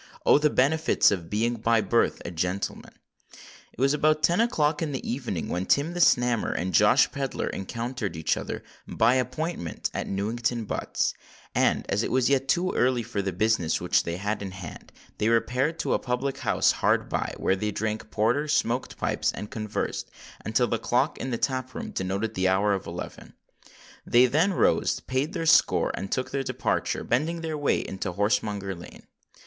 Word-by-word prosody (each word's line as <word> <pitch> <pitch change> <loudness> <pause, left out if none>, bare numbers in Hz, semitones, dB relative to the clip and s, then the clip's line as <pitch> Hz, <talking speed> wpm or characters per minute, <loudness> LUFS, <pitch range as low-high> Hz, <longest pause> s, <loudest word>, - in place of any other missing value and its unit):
—oh! - - +6
the 150 0 +3
benefits 150 +4 +3
of 85 -5 -3
being 115 +3 0
by 115 +1 +2
birth 115 +2 +1
a 85 - -4
gentleman! 90 +3 -3 0.8
It - - -18
was 135 +2 +3
about 155 +1 +2
ten 175 +6 +4
o'clock 155 -10 +1
in 155 -3 -2
the 135 - -5
evening, 120 - -3
when 90 +2 -3
Tim 150 +5 +2
the 175 - -4
Snammer 120 -8 +3
and 90 +1 -2
Josh - - +5
Pedler 135 -2 -3
encountered 115 -2 -4
each 80 -1 0
other, - - -5 0.2
by 115 +2 +3
appointment, 130 - -2
at - - -3
Newington 115 +4 -2
Butts; - - -1 0.4
and, - - +2
as 100 - 0
it - - -2
was 130 +2 +2
yet 135 -1 +2
too 180 +5 +1
early 125 -1 +1
for 100 -2 -3
the 95 0 -2
business 95 -3 +1
which - - +2
they 85 0 -4
had 105 +2 -2
in 100 - -4
hand, 95 -3 -10 0.3
they 105 - +2
repaired 125 +7 +1
to - - -1
a - - +1
public 130 +2 -2
house - - +2
hard - - +1
by, - - -2
where 95 - +1
they 105 +2 -2
drank 110 +1 -3
porter, 120 +8 +1
smoked 125 -4 0
pipes, - - 0
and 105 - -7
conversed, 110 -1 -3 0.3
until - - +2
the - - -1
clock - - 0
in 130 - -3
the 120 - -1
tap 130 -1 -2
room - - -5
denoted 100 +4 -2
the 95 -2 +1
hour 100 +2 +2
of 95 - -3
eleven. - - -8 0.7
They 120 +1 +5
then 160 +10 +2
rose, - - +2
paid 130 +4 -2
their 165 - -2
score, - - +4
and 95 - -5
took 130 - -1
their 140 - -1
departure,—bending 135 +4 -1
their 160 -1 -3
way 145 -1 +1
into 95 -1 -5
Horsemonger 100 0 0
Lane. 85 -1 -12
120 Hz, 185 wpm, -26 LUFS, 100-140 Hz, 0.8 s, oh